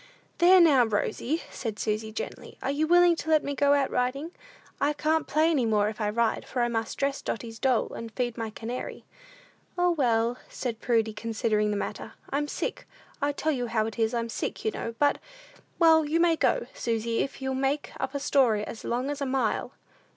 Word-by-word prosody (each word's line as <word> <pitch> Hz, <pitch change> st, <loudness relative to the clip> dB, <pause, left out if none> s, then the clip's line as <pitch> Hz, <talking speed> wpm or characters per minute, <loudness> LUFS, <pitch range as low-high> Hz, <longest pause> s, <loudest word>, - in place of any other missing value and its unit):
"There, 365 Hz, +2 st, +7 dB
now, 295 Hz, -7 st, +6 dB
Rosy," 235 Hz, +7 st, -1 dB
said 220 Hz, -4 st, -5 dB
Susy, 220 Hz, 0 st, -2 dB
gently, 215 Hz, -, -7 dB
"are 270 Hz, -, 0 dB
you 305 Hz, +2 st, 0 dB
willing 350 Hz, 0 st, +6 dB
to 320 Hz, -, -5 dB
let 310 Hz, -1 st, +4 dB
me 285 Hz, -, -2 dB
go 285 Hz, +1 st, +3 dB
out 280 Hz, -2 st, +1 dB
riding? 270 Hz, +6 st, -1 dB, 0.5 s
I 290 Hz, +1 st, +2 dB
can't 310 Hz, +2 st, 0 dB
play 315 Hz, +2 st, +3 dB
any 265 Hz, -7 st, +2 dB
more 210 Hz, -1 st, +2 dB
if 220 Hz, +1 st, -7 dB
I 210 Hz, -, +1 dB
ride, 225 Hz, +1 st, 0 dB
for 250 Hz, -2 st, -2 dB
I -, -, +2 dB
must 225 Hz, -1 st, -2 dB
dress 275 Hz, 0 st, -1 dB
Dotty's 225 Hz, 0 st, -5 dB
doll, 255 Hz, -4 st, +1 dB
and 230 Hz, -1 st, -7 dB
feed 240 Hz, -1 st, -2 dB
my 225 Hz, -2 st, -4 dB
canary." 230 Hz, +3 st, -6 dB, 0.7 s
"O, 355 Hz, 0 st, +3 dB
well," 240 Hz, -5 st, +1 dB
said 235 Hz, -3 st, -4 dB
Prudy, 225 Hz, -2 st, +1 dB
considering 215 Hz, -1 st, 0 dB
the 205 Hz, -, -1 dB
matter, -, -, -5 dB, 0.2 s
"I'm 290 Hz, +2 st, 0 dB
sick; -, -, -4 dB, 0.3 s
I 285 Hz, +1 st, +2 dB
tell 310 Hz, +2 st, -1 dB
you 245 Hz, -4 st, -2 dB
how 220 Hz, -1 st, 0 dB
it 225 Hz, +1 st, -6 dB
is, 225 Hz, +1 st, +1 dB
I'm 230 Hz, 0 st, -2 dB
sick, -, -, -4 dB
you 220 Hz, -, +2 dB
know; 230 Hz, +1 st, -5 dB
but 285 Hz, +2 st, +2 dB, 0.6 s
well, 320 Hz, -2 st, +6 dB
you 310 Hz, +3 st, 0 dB
may 335 Hz, -1 st, +4 dB
go, -, -, +1 dB
Susy, 230 Hz, 0 st, -1 dB
if 275 Hz, -, -2 dB
you'll 265 Hz, 0 st, -2 dB
make 270 Hz, +2 st, -1 dB
up 265 Hz, +1 st, -3 dB
a -, -, 0 dB
story 240 Hz, -7 st, +2 dB
as 225 Hz, -, -8 dB
long 250 Hz, +4 st, -1 dB
as 290 Hz, 0 st, -5 dB
a 280 Hz, -, 0 dB
mile." 260 Hz, 0 st, -1 dB
255 Hz, 205 wpm, -27 LUFS, 225-290 Hz, 0.7 s, There